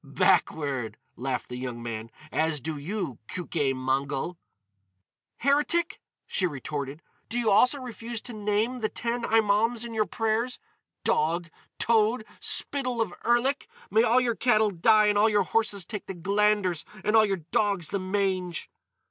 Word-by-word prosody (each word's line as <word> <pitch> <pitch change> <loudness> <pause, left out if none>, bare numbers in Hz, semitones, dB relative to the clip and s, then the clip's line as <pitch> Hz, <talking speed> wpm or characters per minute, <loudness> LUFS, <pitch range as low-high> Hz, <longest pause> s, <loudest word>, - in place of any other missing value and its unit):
"Backward!" 135 -7 +1 0.2
laughed 130 +1 -3
the 125 - -6
young 125 -2 -5
man, 115 -1 -5 0.2
"—as 160 -1 +1
do 155 +3 -4
you, 165 - -4
Keuke 150 -6 -1
Mongol!" 135 +5 -2 1.0
"Heretic!" 295 +5 +1 0.2
she 185 - +1
retorted. 145 0 -5 0.3
"Do 235 - -3
you 230 -3 +2
also 250 +7 +4
refuse 235 -2 -6
to 245 - -7
name 215 +4 0
the 215 -2 -1
ten 240 +1 -2
Imaums 225 +1 +2
in 235 - -7
your 215 -1 +1
prayers? 225 +3 -1 0.5
Dog! 170 +2 +1 0.3
Toad! 225 0 +2
Spittle 255 -4 +2
of 220 -6 0
Erlik! 250 - +2 0.2
May 220 - +5
all 240 +2 +4
your 245 -2 +1
cattle 220 -3 +3
die 215 +4 +4
and 205 -1 +3
all 220 +2 +5
your 205 -2 +3
horses 205 -2 0
take 210 -3 -6
the 195 - -5
glanders 200 -1 +1 0.2
and 210 - +2
all 220 - +7
your 195 -5 -1
dogs 200 -6 +1
the 200 - -1
mange!" 185 -2 -2
205 Hz, 150 wpm, -27 LUFS, 160-230 Hz, 1.0 s, all